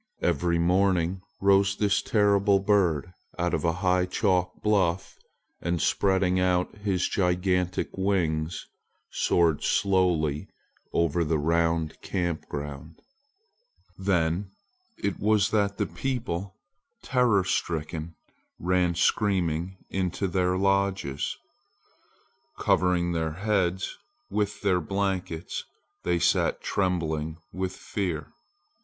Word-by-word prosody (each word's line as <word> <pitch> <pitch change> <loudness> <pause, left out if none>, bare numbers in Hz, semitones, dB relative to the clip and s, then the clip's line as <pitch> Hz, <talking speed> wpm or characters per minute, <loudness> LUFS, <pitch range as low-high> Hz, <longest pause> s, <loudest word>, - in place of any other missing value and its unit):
Every 85 0 +1
morning 90 +1 +2 0.2
rose 100 0 +4
this 105 0 +2
terrible 100 -2 +3
red 95 - -5
bird 90 -5 +2 0.2
out 90 0 0
of - - 0
a 85 - +3
high 90 0 +3
chalk 90 -2 0
bluff 95 -4 +1 0.5
and 85 0 -1
spreading 95 +1 +2
out 90 +1 +1
his 95 -3 0
gigantic 90 -1 0
wings 85 -5 0 0.5
soared 85 -4 +2
slowly 90 -7 +1 0.4
over 85 0 +1
the 80 0 +1
round 80 +1 0
camp 85 -3 -2
ground. 75 +2 -7 1.0
Then 95 0 0 0.5
it 100 -1 -2
was 105 -1 +2
that 100 -2 +1
the - - +1
people, 115 -8 -3 0.5
terror 120 -7 +3
stricken, 80 -2 -2 0.4
ran 90 -1 +1
screaming 90 -2 +1
into 95 +1 -1
their 90 0 +1
lodges. 95 -7 0 1.2
Covering 90 -1 +2
their 80 -2 -1
heads 95 0 -1 0.3
with 105 -1 -1
their 95 -3 +2
blankets, 95 -2 -2 0.4
they 90 -1 +1
sat - - +2
trembling 80 -5 -1 0.2
with 95 0 -3
fear. 85 -7 -4
90 Hz, 105 wpm, -27 LUFS, 85-100 Hz, 1.2 s, rose